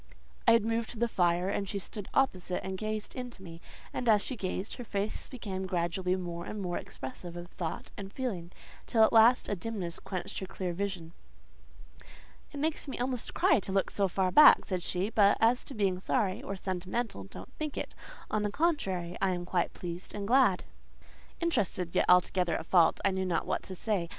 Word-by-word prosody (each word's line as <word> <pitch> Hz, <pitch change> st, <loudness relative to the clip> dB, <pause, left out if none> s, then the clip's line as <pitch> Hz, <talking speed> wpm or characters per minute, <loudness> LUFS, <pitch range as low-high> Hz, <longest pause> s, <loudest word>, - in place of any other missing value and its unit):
I 230 Hz, -, +8 dB
had 230 Hz, -2 st, +4 dB
moved 225 Hz, 0 st, 0 dB
to 240 Hz, -, -7 dB
the 235 Hz, +2 st, +2 dB
fire, 175 Hz, -3 st, +2 dB
and 200 Hz, -1 st, -2 dB
she 200 Hz, -, -2 dB
stood 200 Hz, +1 st, -7 dB
opposite, 185 Hz, -9 st, 0 dB
and 190 Hz, 0 st, -3 dB
gazed 215 Hz, +1 st, -4 dB
into 245 Hz, -6 st, -7 dB
me; 165 Hz, -2 st, -10 dB, 0.3 s
and 245 Hz, -, -1 dB
as 210 Hz, -2 st, +5 dB
she 260 Hz, -, -4 dB
gazed, 190 Hz, -1 st, -3 dB
her 245 Hz, -, -6 dB
face 205 Hz, -2 st, -3 dB
became 190 Hz, -7 st, -5 dB
gradually 180 Hz, +1 st, 0 dB
more 175 Hz, -2 st, -5 dB
and 215 Hz, -, -5 dB
more 180 Hz, -3 st, -2 dB
expressive 170 Hz, +7 st, -8 dB
of 175 Hz, 0 st, -8 dB
thought 170 Hz, -3 st, -5 dB
and 195 Hz, -1 st, -7 dB
feeling, 200 Hz, -9 st, -4 dB, 0.4 s
till 225 Hz, -2 st, +4 dB
at -, -, +4 dB
last 230 Hz, +2 st, +6 dB
a 205 Hz, -, -1 dB
dimness 190 Hz, -3 st, -4 dB
quenched 190 Hz, +1 st, -4 dB
her 190 Hz, -, -5 dB
clear 185 Hz, -2 st, -3 dB
vision. 180 Hz, -3 st, -4 dB, 1.4 s
"It -, -, -8 dB
makes 310 Hz, +1 st, -1 dB
me 270 Hz, -, -4 dB
almost 250 Hz, -1 st, -2 dB
cry 335 Hz, -6 st, +4 dB
to 195 Hz, -, -5 dB
look 195 Hz, -1 st, +1 dB
so 200 Hz, -1 st, +1 dB
far 185 Hz, 0 st, 0 dB
back," 300 Hz, +6 st, +8 dB
said 185 Hz, -2 st, -2 dB
she: 185 Hz, +4 st, -1 dB
"but 205 Hz, -2 st, +5 dB
as 235 Hz, +3 st, +3 dB
to 275 Hz, -, -8 dB
being 195 Hz, -4 st, +1 dB
sorry, 190 Hz, 0 st, 0 dB
or 195 Hz, -, -5 dB
sentimental, 185 Hz, -, -3 dB
don't -, -, -11 dB
think 305 Hz, -2 st, -3 dB
it: -, -, -4 dB, 0.4 s
on 215 Hz, -, +1 dB
the 210 Hz, -, 0 dB
contrary, 195 Hz, -, 0 dB
I 190 Hz, -2 st, +2 dB
am 175 Hz, 0 st, -5 dB
quite 175 Hz, -1 st, 0 dB
pleased 175 Hz, 0 st, -7 dB
and 200 Hz, -1 st, -4 dB
glad." 245 Hz, -6 st, +4 dB, 0.8 s
Interested, 210 Hz, -, 0 dB
yet -, -, +3 dB
altogether 180 Hz, -1 st, +4 dB
at -, -, -6 dB
fault, 170 Hz, -2 st, +4 dB
I 195 Hz, -, +4 dB
knew 190 Hz, 0 st, -1 dB
not 175 Hz, -, 0 dB
what -, -, -1 dB
to 190 Hz, -, -6 dB
say. 185 Hz, -4 st, -1 dB
195 Hz, 200 wpm, -30 LUFS, 180-225 Hz, 1.4 s, I